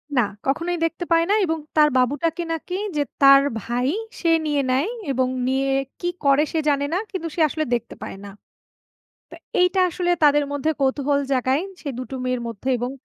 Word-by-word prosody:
না, 245 - +5 0.3
কখনোই 340 +5 0
দেখতে 330 +2 -3
পায় 330 0 +4
না - - +4
এবং 320 -1 -1 0.2
তার 300 0 +6
বাবুটাকে 295 +7 0
নাকি 340 +3 -5 0.2
যে 290 - +2 0.2
তার 275 0 +8 0.2
ভাই, 245 +3 -1 0.3
সে 335 - +1 0.2
নিয়ে 295 -2 +1
নেয় 270 +7 +1 0.2
এবং 260 -1 +1 0.2
নিয়ে 270 +1 +1 0.3
কি 350 - -1 0.2
করে? 280 +2 +5
সে 320 - +1
জানে 285 -1 +1
না, - - +2
কিন্তু 370 -5 -4
সে 335 - 0
আসলে 310 - -2
দেখতে 235 -1 -2
পায় - - -7
না। - - -8 1.0
তা - - -10 0.2
এইটা 360 +1 +3
আসলে 355 +1 -1
তাদের 295 0 +5
মধ্যে 285 +2 0
কৌতূহল 280 +1 +1
জাগায়, 260 +3 +1 0.2
সে 290 - -6
দুটো 255 +1 -6
মেয়ের 255 -1 -1
মধ্যে 230 +3 -6
এবং 245 +2 -2
285 Hz, 185 wpm, -22 LUFS, 260-330 Hz, 1.0 s, তার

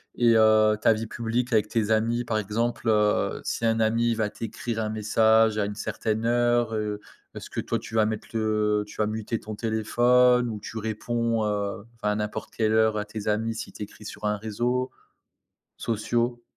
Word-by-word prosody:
et 115 -2 +4
heu, 110 -1 +5
ta 110 - +4
vie 110 +1 -4
publique 120 +2 -2
avec 105 -1 +2
tes 110 -2 0
amis? 115 +2 +1
Par 110 -2 -1
exemple, 115 +3 -2
heu, 105 -1 +2
si 115 - -2
un 115 0 +2
ami 115 +1 +2
va 110 -2 0
t'écrire 115 +1 -5
un 105 - -2
message 110 +1 +3
à 105 - +1
une 105 - -4
certaine 110 +1 -2
heure, 120 -1 +2
heu, 105 -1 -2 0.4
est-ce - - -8
que, - - -3
toi, - - -2
tu 115 - -9
vas 110 - +4
mettre 110 0 -3
le 105 -1 +1
tu - - -13
vas 105 - +2
muter 110 +1 -3
ton 110 0 -7
téléphone 120 +3 +3
ou 105 - -5
tu 110 - -8
réponds, 115 +1 -1
heu, 100 -1 -2
enfin, 105 -2 -1
à 105 - 0
n'importe 105 0 -4
quelle 110 -1 +1
heure 110 -1 +3
à 105 - -2
tes 105 0 -7
amis, 110 +2 0
s'il 110 - -7
t'écrit 105 0 -9
sur 105 0 -7
un 105 0 +1
réseau, 120 +5 -1 0.9
sociaux? 120 +2 -1
110 Hz, 190 wpm, -26 LUFS, 105-115 Hz, 0.9 s, heu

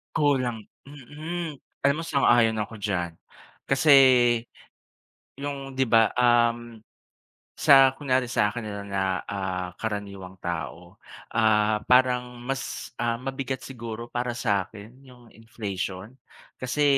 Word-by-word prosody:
Kulang, 130 -6 +1 0.2
mm, 150 +4 -7 0.2
alam 140 +1 +3
mo 165 - -4
sang-ayon 120 -7 +3
ako 110 +2 -6
diyan. 90 -5 -3 0.5
Kasi 135 +3 +3 1.5
yung 140 -1 -6
di 130 - +3
ba, 115 -2 +4
uhm, 120 -1 +2 0.8
sa 135 -1 +6
kunyari 130 -3 0
sakin 115 -1 0
nila 100 -1 -6
na 100 -1 -2 0.2
ah, 95 -2 -4
karaniwang 100 -4 -5
tao, 85 +2 -6 0.3
ah, 110 -1 +2
parang 125 -1 +2
mas, 135 -2 -5
ah, 120 -1 0
mabigat 135 +1 -5
siguro 115 -2 -7
para 120 0 -2
sa 100 -6 0
akin 110 +4 -13
yung 125 -1 -16
inflation 100 -3 -6 0.5
kasi, 130 +4 -1
120 Hz, 115 wpm, -25 LUFS, 105-130 Hz, 1.5 s, sa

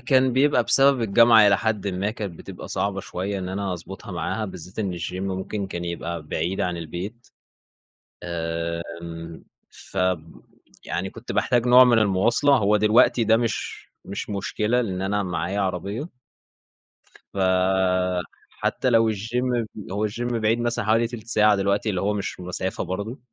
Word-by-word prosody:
كان 130 0 +3
بيبقى 145 +3 +3
بسبب 135 -2 +4
الجامعة 115 0 +6
إلى 100 -1 +5
حدٍّ 105 0 -1
ما، 95 +2 -1
كانت 100 -7 -6
بتبقى - - -9
صعبة 100 -1 -1
شوية 95 +2 -4
إن 90 -1 -4
أنا 95 0 -2
أضبطها 95 +4 -8
معاها 110 +5 -2
بالذات 90 -1 -9
إن 100 -4 -1
الGYM 90 +2 -4 0.2
ممكن 100 +1 -4
كان 85 -2 -5
يبقى 85 -1 -4
بعيد 85 +5 -2
عن 90 -1 -1
البيت. 90 +8 -7 1.0
آمم، 85 0 -5 0.5
فب 90 -3 -2 0.4
يعني - - -3
كنت - - -8
باحتاج 120 -1 +1
نوع 125 +1 +8
من 120 -2 +4
المواصلة 115 +7 +3
هو 105 -3 +3
دلوقتي 110 +3 +4
ده 110 +1 +5
مش 115 -1 -3 0.2
مش 100 +2 -6
مشكلة 105 +4 0
لأن 95 -6 -3
أنا 100 +1 0
معايّا 95 +2 -2
عربية، 100 - -3 1.3
فحتى 95 +3 0
لو 115 -2 +4
الGYM 120 +3 -1 0.3
هو 105 +2 0
الGYM 120 +3 -3
بعيد 110 +2 +2
مثلًا 120 -2 -1
حوالي 115 +2 +3
تِلت 115 -1 -9
ساعة 105 -3 +4
دلوقتي 100 +2 0
اللي 95 -3 -1
هو 105 +1 +1
مش 100 -1 -4
مسافة 90 +1 -3
برضه. 100 - -5
100 Hz, 150 wpm, -24 LUFS, 90-115 Hz, 1.3 s, نوع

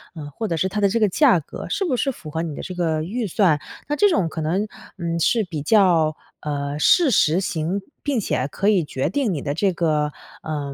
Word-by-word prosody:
呃， 150 -2 -7
或 225 - -3
者 165 - -1
是 185 - +1
它 210 +2 -2
的 200 - +4
这 230 +3 0
个 215 - +4
价 245 - +4
格 145 - -8
是 390 - -1
不 290 -8 0
是 270 +3 0
符 160 -10 -10
合 160 +2 -3
你 155 -4 -5
的 - - -6
这 185 - -7
个 160 -3 0
预 225 +7 -3
算。 170 -5 +2 0.3
那 295 - 0
这 410 +6 +4
种 190 - +1
可 160 - -5
能， 180 +7 0 0.3
嗯， 170 -2 -2
是 220 +6 +2
比 160 -5 -5
较， 165 -4 +3 0.3
呃， 145 -1 -3
事 305 - +5
实 160 -1 +3
型， 175 +1 -2 0.2
并 280 -5 0
且 130 -9 -1
可 195 +7 -2
以 200 -6 +4
决 140 +1 -2
定 250 +1 0
你 155 -6 -2
的 140 - -2
这 190 +4 +1
个 155 -3 0 0.3
呃， 145 -3 -4
170 Hz, 250 characters per minute, -22 LUFS, 155-210 Hz, 0.3 s, 事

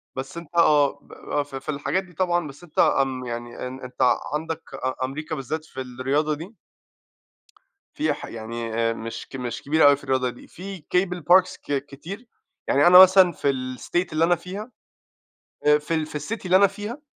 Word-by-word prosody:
بس 135 +5 -6
أنت 170 0 -10
آه، 145 -4 +4
ب - - -26
ب 145 - -2
ف 145 -1 -8
في 135 - -7
الحاجات 150 +5 -1
دي 180 -1 -17
طبعًا، 175 -1 0
بس 145 +4 -12
أنت 175 - -6
آمم 130 -2 +2
يعني 120 +1 -5
أن 130 +1 -8
أنت 125 0 +2 0.2
عندك 160 +1 -3
أ 130 -1 -3
أمريكا 145 +4 -5
بالذات 155 +4 -4
في 130 - -7
الرياضة 135 +4 -1
دي 165 +8 -8 1.4
فيها 305 +1 +1
ح - - -8
يعني 115 0 -6
آآ 115 0 +1
مش 115 0 -7
ك - - -10
مش 125 -2 -4
كبيرة 150 +1 +4
أوي 145 - +7
في 140 - -15
الرياضة 130 -2 0
دي، 120 - -12
في 190 -2 -9
cable 180 -1 +1
parks 185 0 +4
ك 140 -1 -2
كتير، 185 - -9 0.4
يعني 145 +4 +4
أنا 180 +1 +10
مثلًا 185 -1 +8
في 145 -3 0
الstate 130 +7 -2
اللي 155 +1 +2
أنا 175 +1 +3
فيها، 195 +7 -8 0.9
آآ 150 0 +6
في 150 +2 -4
ال 160 -1 0
في 150 -1 -5
الcity 210 +8 -5
اللي 185 +1 +5
أنا 200 +1 +6
فيها 210 +8 -7
150 Hz, 195 wpm, -24 LUFS, 130-180 Hz, 1.4 s, أنا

